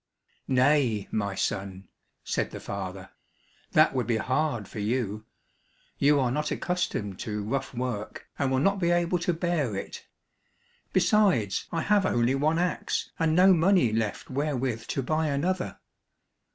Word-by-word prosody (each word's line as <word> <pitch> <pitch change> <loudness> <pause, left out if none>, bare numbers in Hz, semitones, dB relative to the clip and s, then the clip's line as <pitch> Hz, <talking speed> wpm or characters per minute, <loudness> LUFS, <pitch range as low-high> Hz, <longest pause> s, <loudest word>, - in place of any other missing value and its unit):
"Nay, 130 -5 +2
my 100 -2 -1
son," 95 0 -3 0.4
said - - -1
the - - -8
father, 95 -1 -6 0.6
"that - - +5
would 125 -4 -1
be 115 -2 +1
hard 130 -4 -1
for - - -8
you; 110 -1 -2 0.7
you 145 +1 +4
are 125 -3 +1
not 150 +3 -1
accustomed 110 - -2
to 105 -1 -3
rough 135 +5 -2
work, 120 -4 -4
and 140 - +1
will 130 - +1
not 195 +8 +2
be 170 -2 +1
able 175 0 +2
to 170 - 0
bear 160 - -1
it, 100 - -7 0.8
besides 190 - +2
I 165 - -1
have 205 -2 +3
only 120 +2 +2
one 150 +4 +1
axe 180 0 -1
and 160 -1 +2
no 185 +2 +7
money 175 - +3
left 110 +1 -2
wherewith 130 -4 -2
to 135 - -2
buy 155 +4 0
another." 175 +6 -1
135 Hz, 150 wpm, -27 LUFS, 110-165 Hz, 0.8 s, no